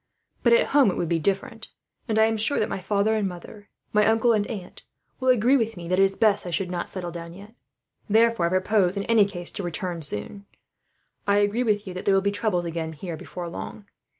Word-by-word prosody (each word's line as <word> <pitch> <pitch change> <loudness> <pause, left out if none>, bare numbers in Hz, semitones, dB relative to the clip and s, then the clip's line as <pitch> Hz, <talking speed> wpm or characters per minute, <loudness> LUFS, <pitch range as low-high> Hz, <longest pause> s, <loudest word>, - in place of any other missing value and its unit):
But 235 - +4
at 235 - +3
home 280 -6 +6
it 180 - -3
would 170 - -2
be 170 -1 +1
different; 210 - -2 0.4
and 220 - 0
I 220 - +6
am 225 0 0
sure 220 +6 +2
that 215 - +1
my - - -3
father 200 +3 +1
and 215 -2 0
mother, 190 +3 -10 0.2
my 210 0 +4
uncle 225 +1 +3
and 210 -2 0
aunt 200 -7 -8 0.4
will 260 -1 0
agree 250 +2 +4
with 225 -4 -2
me 170 -1 -7
that 185 +1 +1
it - - +6
is 195 0 +1
best 210 -4 +2
I - - -3
should 180 +1 -2
not 175 -1 -3
settle 180 -2 -5
down, 170 0 -8
yet. 205 +3 -13 0.6
Therefore 225 -4 +3
I - - -1
propose, 185 +1 +1
in 200 - -1
any 225 -2 +4
case, 175 -3 -2
to - - -5
return 175 -1 -4
soon. 155 - -4 0.8
"I 200 0 +3
agree 205 +3 +1
with 210 -4 0
you 185 - -6
there 190 +2 +1
will - - +5
be 200 +1 0
troubles 205 -4 -1
again 165 -1 -4
here, 165 +2 -6
before 175 +2 -7
long. 200 +4 -8
200 Hz, 230 wpm, -25 LUFS, 175-220 Hz, 0.8 s, home